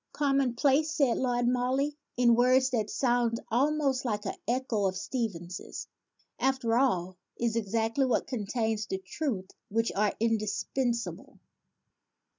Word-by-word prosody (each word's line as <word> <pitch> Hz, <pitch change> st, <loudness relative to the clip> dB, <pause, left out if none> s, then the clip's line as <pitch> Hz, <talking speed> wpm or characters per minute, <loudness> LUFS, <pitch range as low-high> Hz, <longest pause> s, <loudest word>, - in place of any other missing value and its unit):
"Common 275 Hz, -4 st, +1 dB
place," 285 Hz, +5 st, +3 dB
said 275 Hz, -7 st, +2 dB
Lord 245 Hz, -1 st, +1 dB
Morley 255 Hz, +4 st, +1 dB, 0.2 s
(in 240 Hz, -1 st, +5 dB
words 255 Hz, +2 st, +4 dB
that 220 Hz, -4 st, 0 dB
sound 240 Hz, -2 st, +1 dB
almost 275 Hz, +1 st, +2 dB
like 210 Hz, -4 st, -2 dB
an 195 Hz, -, -2 dB
echo 235 Hz, -5 st, +1 dB
of 185 Hz, 0 st, -2 dB
Stevenson's), 185 Hz, -6 st, -4 dB, 0.5 s
"after 260 Hz, -4 st, +1 dB
all, 185 Hz, -8 st, +1 dB, 0.2 s
is 230 Hz, -1 st, 0 dB
exactly 230 Hz, +4 st, +1 dB
what 250 Hz, -, +1 dB
contains 220 Hz, -2 st, -2 dB
the 190 Hz, -, -2 dB
truths 190 Hz, 0 st, -4 dB, 0.2 s
which 230 Hz, +2 st, +1 dB
are 210 Hz, +1 st, +2 dB
indispensable." 230 Hz, +2 st, -1 dB
240 Hz, 125 wpm, -29 LUFS, 215-260 Hz, 0.5 s, in